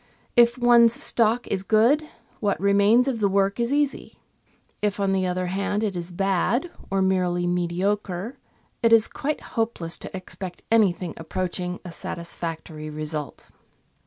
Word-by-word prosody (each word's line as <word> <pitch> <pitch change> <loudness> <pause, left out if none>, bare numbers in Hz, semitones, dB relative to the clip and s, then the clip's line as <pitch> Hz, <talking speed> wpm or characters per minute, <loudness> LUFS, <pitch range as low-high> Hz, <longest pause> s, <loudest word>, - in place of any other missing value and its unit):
If 235 +1 +5
one's 240 -1 +6
stock 235 0 +1
is 190 - -1
good, 235 +10 +3 0.3
what 205 -2 0
remains 200 +5 +4
of 250 -4 -1
the 200 -2 +2
work 195 +2 +1
is 235 +2 0
easy; 290 -1 -1 0.6
if, 205 -1 -1
on 195 -1 +1
the 190 -1 +1
other 180 0 -1
hand, 200 +3 -1
it 205 -3 -1
is 175 0 -4
bad 195 - 0 0.2
or 195 0 +1
merely 180 -2 +1
mediocre, 180 +5 -1 0.5
it 230 -1 +3
is 225 -1 +6
quite 300 +1 -3
hopeless 225 -8 -1
to - - -7
expect 185 0 -8
any 220 -4 +5
thing 175 -1 -6
approaching 180 +2 -3
a 175 - -6
satisfactory 165 -2 -6
result. 150 -1 -5
195 Hz, 150 wpm, -24 LUFS, 180-230 Hz, 0.6 s, one's